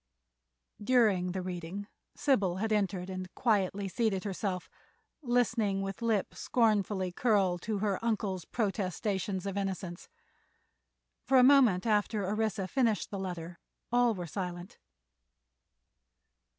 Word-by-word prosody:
During 205 Hz, -7 st, +3 dB
the 185 Hz, 0 st, -3 dB
reading 180 Hz, +2 st, -5 dB, 0.3 s
Sybil 205 Hz, -11 st, +2 dB
had 220 Hz, +4 st, -2 dB
entered 190 Hz, -3 st, 0 dB
and 185 Hz, -1 st, -6 dB
quietly 200 Hz, -3 st, +1 dB
seated 200 Hz, -1 st, 0 dB
herself, 190 Hz, -2 st, -3 dB, 0.5 s
listening 230 Hz, -6 st, +1 dB
with 195 Hz, +3 st, -5 dB
lip 225 Hz, -4 st, 0 dB
scornfully 205 Hz, -5 st, +1 dB
curled 190 Hz, -4 st, +2 dB
to 215 Hz, +1 st, -2 dB
her 200 Hz, 0 st, -1 dB
uncle's 200 Hz, -5 st, -1 dB
protestations 195 Hz, -2 st, -2 dB
of 200 Hz, 0 st, -3 dB
innocence. 190 Hz, -3 st, -4 dB, 1.2 s
For 265 Hz, -, +5 dB
a 250 Hz, -, +7 dB
moment 250 Hz, -9 st, +5 dB
after 210 Hz, -1 st, +1 dB
Orissa 210 Hz, -1 st, -1 dB
finished 230 Hz, -3 st, 0 dB
the 200 Hz, -, -4 dB
letter 175 Hz, -2 st, -6 dB, 0.3 s
all 240 Hz, -2 st, +3 dB
were 180 Hz, -2 st, -5 dB
silent. 175 Hz, +1 st, -6 dB
200 Hz, 115 wpm, -31 LUFS, 185-220 Hz, 1.2 s, a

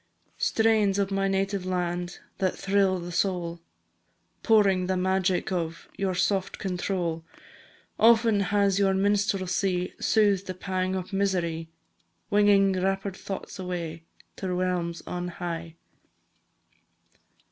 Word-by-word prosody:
Strains 220 Hz, -3 st, +3 dB
of 200 Hz, -1 st, 0 dB
my 195 Hz, 0 st, +1 dB
native 195 Hz, 0 st, 0 dB
land, 175 Hz, -1 st, -2 dB, 0.2 s
That 185 Hz, -1 st, 0 dB
thrill 195 Hz, -1 st, +2 dB
the 175 Hz, 0 st, -6 dB
soul, 175 Hz, -2 st, -1 dB, 0.8 s
Pouring 195 Hz, -5 st, +4 dB
the 185 Hz, 0 st, 0 dB
magic 185 Hz, 0 st, +1 dB
of 165 Hz, -2 st, -3 dB
Your 190 Hz, -2 st, -1 dB
soft 185 Hz, +2 st, 0 dB
control! 180 Hz, -3 st, -2 dB, 0.8 s
Often 225 Hz, -2 st, +5 dB
has 200 Hz, -1 st, +2 dB
your 195 Hz, -1 st, +3 dB
minstrelsy 190 Hz, -2 st, 0 dB
Soothed 200 Hz, -3 st, +2 dB
the 185 Hz, -, -4 dB
pang 185 Hz, 0 st, -2 dB
of 185 Hz, +1 st, -5 dB
misery, 175 Hz, -5 st, -1 dB, 0.6 s
Winging 205 Hz, -1 st, +5 dB
rapid 195 Hz, 0 st, -1 dB
thoughts 195 Hz, 0 st, -7 dB
away 170 Hz, -3 st, -4 dB, 0.4 s
To 190 Hz, -2 st, -3 dB
realms 180 Hz, -2 st, -1 dB
on 180 Hz, 0 st, -4 dB
high. 170 Hz, -2 st, -5 dB
190 Hz, 115 wpm, -27 LUFS, 180-195 Hz, 0.8 s, Often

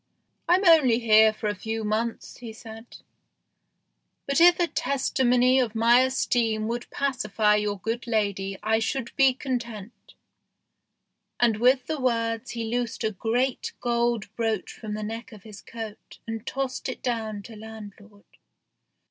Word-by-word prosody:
"I'm 370 Hz, +3 st, +4 dB
only 300 Hz, -9 st, +6 dB
here 220 Hz, -2 st, +5 dB
for 215 Hz, 0 st, -5 dB
a 205 Hz, -, 0 dB
few 220 Hz, +3 st, -4 dB
months," 220 Hz, +2 st, -3 dB
he 235 Hz, -2 st, -8 dB
said; 225 Hz, 0 st, -11 dB, 0.7 s
" -, -, -52 dB
but 275 Hz, +4 st, +2 dB
if 350 Hz, +1 st, +7 dB
a 350 Hz, -, +4 dB
testimony 260 Hz, -3 st, +2 dB
of 235 Hz, -3 st, -1 dB
my 230 Hz, +2 st, +5 dB
esteem 235 Hz, -4 st, +1 dB
would 240 Hz, +1 st, -4 dB
pacify 215 Hz, -6 st, +1 dB
your 210 Hz, -1 st, -1 dB
good 225 Hz, +5 st, -4 dB
lady 200 Hz, -3 st, -1 dB
I 220 Hz, +1 st, +2 dB
should 235 Hz, +2 st, -3 dB
be 270 Hz, -2 st, +4 dB
content," 235 Hz, -5 st, -6 dB, 1.2 s
and 230 Hz, -3 st, +3 dB
with 250 Hz, +3 st, +3 dB
the 315 Hz, -2 st, -3 dB
words 230 Hz, -1 st, -1 dB
he 230 Hz, -1 st, -4 dB
loosed 235 Hz, +1 st, -3 dB
a 220 Hz, -, 0 dB
great 240 Hz, +6 st, -1 dB
gold 235 Hz, -3 st, -1 dB
brooch 225 Hz, -4 st, -2 dB
from 215 Hz, -2 st, -6 dB
the 215 Hz, -, -5 dB
neck 225 Hz, +2 st, -6 dB
of 205 Hz, -3 st, -13 dB
his 210 Hz, -2 st, -11 dB
coat 225 Hz, -2 st, -9 dB
and 225 Hz, +1 st, -6 dB
tossed 270 Hz, -1 st, -3 dB
it 255 Hz, -, -7 dB
down 220 Hz, -4 st, -3 dB
to 225 Hz, -, -11 dB
landlord. 210 Hz, -1 st, -12 dB
230 Hz, 150 wpm, -26 LUFS, 215-250 Hz, 1.2 s, if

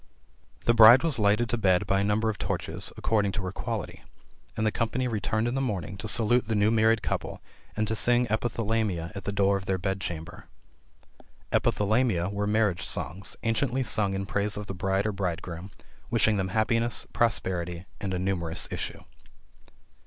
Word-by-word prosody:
The 120 Hz, -, +4 dB
bride 115 Hz, +4 st, +9 dB
was 155 Hz, -8 st, 0 dB
lighted 105 Hz, +3 st, +3 dB
to 120 Hz, -, -1 dB
bed 95 Hz, -4 st, +3 dB
by 95 Hz, -, +1 dB
a -, -, +1 dB
number 105 Hz, +2 st, +1 dB
of 105 Hz, -, -11 dB
torches, -, -, -3 dB
according 105 Hz, -3 st, +1 dB
to 95 Hz, -, -3 dB
her 90 Hz, -, -3 dB
quality; -, -, -5 dB, 0.5 s
and 110 Hz, -, 0 dB
the 110 Hz, -, +2 dB
company 120 Hz, +3 st, -1 dB
returned 110 Hz, 0 st, -1 dB
in 120 Hz, -, -1 dB
the 135 Hz, -, -1 dB
morning 100 Hz, -, -3 dB
to 110 Hz, -, -5 dB
salute 110 Hz, +2 st, +3 dB
the 110 Hz, -, 0 dB
new 105 Hz, +1 st, +3 dB
married 110 Hz, 0 st, +3 dB
couple, -, -, -3 dB, 0.4 s
and 110 Hz, 0 st, 0 dB
to 110 Hz, -, -1 dB
sing 120 Hz, +2 st, +3 dB
epithalamia 110 Hz, -6 st, -1 dB
at 100 Hz, -, -7 dB
the 100 Hz, -, -1 dB
door 100 Hz, -1 st, +2 dB
of 95 Hz, -, -9 dB
their 95 Hz, -, +1 dB
bed 95 Hz, +1 st, -2 dB
chamber. 85 Hz, -2 st, -6 dB, 1.0 s
Epithalamia 105 Hz, -4 st, +1 dB
were 100 Hz, 0 st, -2 dB
marriage 105 Hz, -6 st, +1 dB
songs, 90 Hz, +4 st, -4 dB
anciently 120 Hz, +3 st, 0 dB
sung 105 Hz, -4 st, 0 dB
in 95 Hz, 0 st, -3 dB
praise 105 Hz, +1 st, -2 dB
of 105 Hz, -, -5 dB
the 95 Hz, -, -5 dB
bride 95 Hz, +2 st, -1 dB
or 105 Hz, -, +1 dB
bridegroom, 90 Hz, -2 st, -4 dB, 0.4 s
wishing 110 Hz, -, +3 dB
them 95 Hz, -1 st, -1 dB
happiness, 115 Hz, +4 st, +1 dB
prosperity 90 Hz, -6 st, 0 dB
and 100 Hz, -, -3 dB
a 90 Hz, -, -1 dB
numerous 90 Hz, -3 st, 0 dB
issue. -, -, -5 dB
105 Hz, 180 wpm, -27 LUFS, 95-115 Hz, 1.0 s, bride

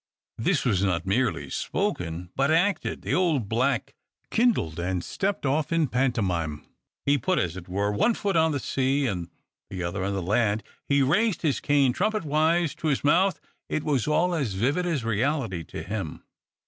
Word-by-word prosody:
'" -, -, -66 dB
This 160 Hz, -8 st, +1 dB
was 100 Hz, -7 st, +2 dB
not 90 Hz, -3 st, 0 dB
merely 115 Hz, +5 st, 0 dB
spoken, 85 Hz, +1 st, -2 dB
but 135 Hz, +1 st, +2 dB
acted. 175 Hz, +5 st, +1 dB
The -, -, -1 dB
old 160 Hz, -, +2 dB
black 125 Hz, +5 st, 0 dB, 0.4 s
kindled, 220 Hz, -, +1 dB
and 90 Hz, 0 st, -1 dB
stepped 195 Hz, -5 st, -2 dB
off 145 Hz, +4 st, 0 dB
in 165 Hz, -1 st, +3 dB
pantomime. 90 Hz, -, -1 dB, 0.4 s
He 140 Hz, 0 st, +3 dB
put, 185 Hz, +5 st, 0 dB
as 90 Hz, -1 st, 0 dB
it 95 Hz, -1 st, -9 dB
were, 100 Hz, +3 st, 0 dB
one 215 Hz, -, +2 dB
foot 200 Hz, -3 st, -1 dB
on 160 Hz, -1 st, +4 dB
the 145 Hz, -, -1 dB
sea, 135 Hz, +3 st, 0 dB
and 90 Hz, -7 st, -2 dB, 0.4 s
the 95 Hz, -2 st, -4 dB
other 90 Hz, +3 st, -2 dB
on 100 Hz, +1 st, -1 dB
the 95 Hz, -, -2 dB
land; 105 Hz, +2 st, +1 dB, 0.3 s
he 140 Hz, -1 st, +4 dB
raised 200 Hz, -, +2 dB
his 150 Hz, -4 st, +1 dB
cane 140 Hz, -3 st, +3 dB
trumpetwise 165 Hz, -, +1 dB
to 160 Hz, -, -3 dB
his 140 Hz, -3 st, +1 dB
mouth. 185 Hz, +6 st, +3 dB, 0.3 s
It 155 Hz, -, -1 dB
was 140 Hz, -5 st, 0 dB
all 160 Hz, +4 st, +2 dB
as 135 Hz, -, -1 dB
vivid 145 Hz, -, +1 dB
as 155 Hz, -8 st, -1 dB
reality 115 Hz, -, -1 dB
to 80 Hz, -, -7 dB
him. 100 Hz, -3 st, -5 dB
135 Hz, 180 wpm, -26 LUFS, 95-160 Hz, 0.4 s, on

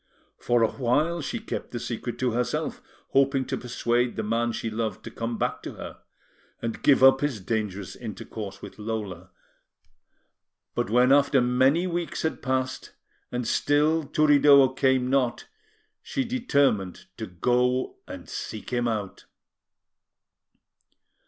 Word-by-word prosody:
For 120 Hz, -1 st, +2 dB
a 110 Hz, -, +2 dB
while, 150 Hz, +7 st, 0 dB
she 235 Hz, -, -3 dB
kept 225 Hz, -, -5 dB
the 120 Hz, -, -5 dB
secret 120 Hz, 0 st, -4 dB
to 125 Hz, -1 st, 0 dB
herself, 120 Hz, 0 st, -2 dB, 0.3 s
hoping 135 Hz, -1 st, +2 dB
to -, -, -2 dB
persuade 120 Hz, 0 st, -1 dB
the 110 Hz, -, -2 dB
man 115 Hz, +2 st, 0 dB
she 115 Hz, 0 st, -4 dB
loved 110 Hz, 0 st, -3 dB
to -, -, -8 dB
come 115 Hz, 0 st, -4 dB
back -, -, -2 dB
to -, -, -7 dB
her, -, -, -9 dB, 0.6 s
and 115 Hz, -1 st, -4 dB
give 135 Hz, -2 st, +4 dB
up 135 Hz, 0 st, +7 dB
his 145 Hz, -7 st, -1 dB
dangerous 100 Hz, -2 st, -3 dB
intercourse 110 Hz, -3 st, -7 dB
with -, -, -10 dB
Lola; 105 Hz, -5 st, -5 dB, 1.4 s
but -, -, -1 dB
when 125 Hz, +3 st, +4 dB
after 140 Hz, 0 st, +5 dB
many 130 Hz, +7 st, +3 dB
weeks 175 Hz, -2 st, -3 dB
had 160 Hz, -, -2 dB
passed, 130 Hz, 0 st, -2 dB, 0.4 s
and 125 Hz, -1 st, -2 dB
still 150 Hz, +5 st, +2 dB
Turiddu 145 Hz, -2 st, +5 dB
came 130 Hz, -2 st, +2 dB
not, 130 Hz, -2 st, 0 dB, 0.6 s
she 270 Hz, -, -2 dB
determined 140 Hz, -, 0 dB
to -, -, -5 dB
go 125 Hz, -, 0 dB
and 280 Hz, -1 st, -9 dB
seek 110 Hz, -, -6 dB
him 120 Hz, -1 st, 0 dB
out. 105 Hz, -4 st, -4 dB
125 Hz, 140 wpm, -26 LUFS, 115-140 Hz, 1.4 s, up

